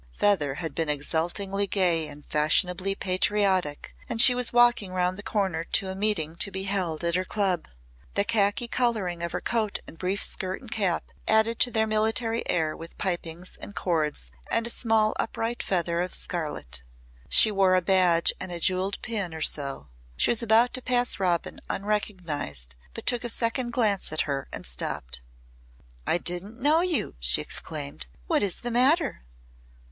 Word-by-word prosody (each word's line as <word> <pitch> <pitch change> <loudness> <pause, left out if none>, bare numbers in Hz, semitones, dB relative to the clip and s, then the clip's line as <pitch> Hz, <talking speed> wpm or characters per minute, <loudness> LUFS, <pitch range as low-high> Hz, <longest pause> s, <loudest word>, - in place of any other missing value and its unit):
Feather 150 -10 +1
had 160 -1 -5
been 160 0 -2
exultingly 175 +7 -1
gay 175 -5 +2
and 145 0 -11
fashionably 180 +5 +2
patriotic 185 -5 0
and 235 -3 -3
she 250 +2 +9
was 245 -1 +2
walking 240 -5 +3
round 180 0 0
the 200 - -7
corner 190 -6 -1
to 190 +3 0
a 190 - -4
meeting 190 -6 0
to 200 - +1
be 190 0 -4
held 185 -5 -2
at 170 0 0
her 185 +1 +1
club. 190 -4 -1 0.5
The 200 - +3
khaki 210 +1 +1
colouring 215 -9 -1
of 170 0 -3
her - - -3
coat 220 -3 -1
and 165 - -12
brief 190 +2 0
skirt 185 -1 -2
and 245 - -14
cap 195 -6 -1 0.2
added 220 +1 +2
to 245 - +4
their 220 -2 +1
military 225 +2 +1
air 160 -2 0
with 165 0 -11
pipings 175 -1 -3
and 205 - -8
cords 150 - -1 0.2
and 230 - 0
a 235 - 0
small 220 -2 +1
upright 230 +1 -2
feather 170 -2 0
of 180 0 -2
scarlet. 150 - -2 0.5
She 220 - +5
wore 195 -2 +3
a 185 - +3
badge 180 -2 +4
and 185 - -5
a 175 - -3
jewelled 185 +3 +1
pin 200 -8 -3
or 160 - -7
so. 140 - -2 0.3
She - - +3
was 235 - +1
about 230 +2 +3
to 255 - -2
pass 245 -2 +2
Robin 175 -3 -1
unrecognised 165 - -2 0.2
but - - -7
took 245 -1 0
a 240 - -2
second 235 +2 -1
glance 215 -8 0
at 155 - 0
her 140 -2 -3
and - - -7
stopped. - - -2 0.9
"I - - +3
didn't 180 +7 -1
know 300 +5 +3
you," 350 -4 0
she - - +4
exclaimed. 70 -2 -2 0.2
"What - - +1
is 200 -4 0
the 240 - -3
matter?" 270 +6 +3
190 Hz, 175 wpm, -26 LUFS, 165-220 Hz, 0.9 s, she